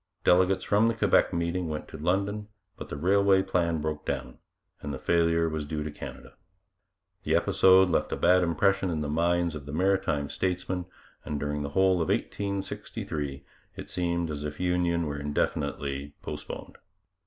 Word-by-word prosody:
Delegates 95 +1 +4
from 105 +2 +3
the 115 - +1
Quebec - - +3
meeting 85 0 -1
went 75 -1 -4
to - - -10
London, 100 +6 -1 0.3
but - - -9
the 70 - -5
railway 95 +3 +4
plan 85 -3 0
broke 75 0 -3
down, - - -4 0.4
and 70 - -4
the 70 - -4
failure 85 0 +2
was 80 -1 -2
due 75 0 -3
to 75 - -5
Canada. - - -9 0.9
The - - +1
episode 95 0 +5
left 90 - 0
a - - 0
bad 90 +1 +4
impression 95 +3 +2
in 80 -3 -1
the 75 - -2
minds 85 +2 +1
of 75 -2 -8
the - - -5
maritime 85 -4 +1
statesmen, 90 -1 -2 0.4
and 75 -1 -3
during 75 +1 -2
the 70 - -3
whole 95 -2 +4
of 80 - -1
1863 100 -8 -3 0.3
it - - -9
seemed 85 -2 -1
as 75 -1 -5
if 75 -1 -5
union 90 -2 +1
were 75 -1 -3
indefinitely 70 -1 -2
postponed. - - -7
85 Hz, 165 wpm, -28 LUFS, 75-95 Hz, 0.9 s, episode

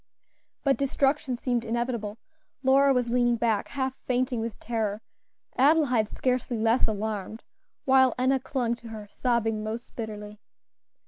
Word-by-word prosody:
But 275 -1 +3
destruction 275 -1 +1
seemed 240 -1 -1
inevitable. 230 -2 -2 0.5
Lora 275 +1 +5
was 250 -2 +1
leaning 240 -1 +3
back, 225 -3 0
half 265 -2 -2
fainting 250 -1 0
with 225 -1 -5
terror; 220 -2 -2 0.5
Adelaide 265 -6 +4
scarcely 250 -2 -1
less 225 +3 +3
alarmed, 215 0 -4 0.4
while 260 -2 +5
Enna 260 +1 +2
clung 245 -2 -1
to 235 - -12
her, 215 -2 -8
sobbing 225 -3 0
most 225 +2 -6
bitterly. 210 -2 -6
240 Hz, 130 wpm, -27 LUFS, 220-260 Hz, 0.5 s, Lora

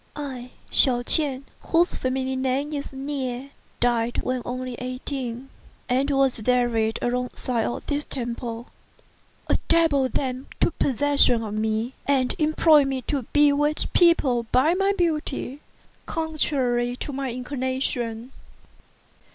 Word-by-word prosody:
I, 260 -4 -6 0.2
Hsiao 245 -2 +6
ch'ien, 275 0 +3 0.2
whose 340 +2 +3
family 260 0 -2
name 265 +3 -1
is 285 -1 -4
Nieh, 270 -1 -4 0.3
died 240 -1 +1
when 255 0 -2
only 255 +1 -4
eighteen, 255 0 -5 0.4
and 260 +3 +1
was 270 -4 +1
buried 230 -2 +1
alongside 245 -1 -1
of - - -5
this 290 0 -2
temple. 235 -2 -5 0.8
A - - +1
devil 300 -6 +3
then 260 0 -3
took - - 0
possession 275 -3 +3
of 210 -2 -5
me, 220 +3 -1
and 265 -3 +2
employed 310 -2 +4
me 265 -2 -3
to 270 -3 -3
bewitch 295 +1 +2
people 270 -9 +3
by 285 +7 +4
my 390 +2 +2
beauty, 300 -5 -2 0.5
contrary 265 -7 0
to 280 - -6
my 270 -1 -3
inclination. 250 -2 -3
260 Hz, 120 wpm, -24 LUFS, 245-285 Hz, 0.8 s, Hsiao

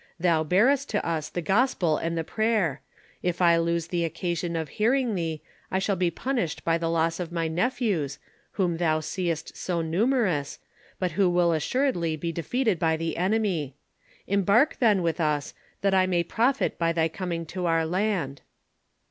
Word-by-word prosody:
Thou 165 -2 +2
bearest 250 - +3
to 210 - -1
us 160 -2 -2
the 175 - -4
gospel 190 - +2
and 165 0 -2
the 165 - 0
prayer: 210 - 0 0.4
if 180 -1 -1
I 170 -2 +5
lose 170 0 0
the 175 -1 0
occasion 170 +1 -2
of 160 -3 -3
hearing 240 - +1
thee, 165 -4 -3 0.3
I 190 - 0
shall 195 +1 0
be 180 -1 +1
punished 230 - -3
by 165 0 +2
the 165 0 -1
loss 165 0 +1
of 175 -2 -4
my 165 -1 -1
neph 180 +11 -1
ews, 155 - 0 0.4
whom 175 -4 0
thou 160 -2 +1
seest 165 -1 -3
so 170 -2 -2
numerous, 180 - 0 0.4
but 185 -2 -1
who 185 +3 +2
will 175 -1 +3
assuredly 170 - 0
be 165 +2 -3
defeated 195 - 0
by 160 -1 +2
the 165 0 -3
enemy. 185 -7 0 0.5
Embark, 200 - +3
then, 210 -7 +3
with 170 0 0
us, 150 -2 0 0.3
that 195 -1 +2
I 185 -1 +4
may 175 -2 +1
profit 245 +10 0
by 165 0 +2
thy 165 -1 +2
coming 170 0 -4
into 175 +2 -4
our 165 -1 +2
land." 180 -6 -1
175 Hz, 175 wpm, -26 LUFS, 165-200 Hz, 0.5 s, I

